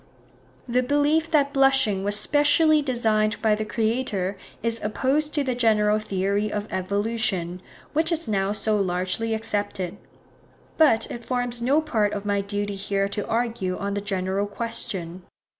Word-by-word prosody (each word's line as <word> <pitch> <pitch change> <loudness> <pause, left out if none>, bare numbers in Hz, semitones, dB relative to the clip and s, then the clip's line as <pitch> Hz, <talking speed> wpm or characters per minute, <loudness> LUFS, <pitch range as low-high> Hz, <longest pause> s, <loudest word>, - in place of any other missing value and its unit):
The 250 +1 +2
belief 290 +5 +2
that 285 -3 +2
blushing 270 -8 +3
was 205 +1 +1
SPECIALLY 300 +1 +4
designed 220 -5 +1
by 220 -1 +3
the 215 +1 -1
Creator 215 -3 -1 0.3
is 230 0 0
opposed 270 +8 0
to 290 - +2
the 260 -2 -1
general 215 -3 +3
theory 200 +1 -1
of 210 0 -2
evolution, 190 -2 -1 0.3
which 320 +3 +1
is 330 -5 -1
now 195 -2 0
so 210 0 0
largely 185 +4 -1
accepted; 205 -4 -3 0.8
but 290 -9 +4
it 235 - -6
forms 245 -1 -2
no 275 +6 +3
part 220 -9 0
of 200 0 -4
my 200 -1 +1
duty 205 0 -3
here 195 0 -1
to 205 0 -3
argue 225 -6 -1
on 200 0 -3
the 205 - -2
general 195 0 -1
question. 195 -5 -4
215 Hz, 150 wpm, -24 LUFS, 200-250 Hz, 0.8 s, SPECIALLY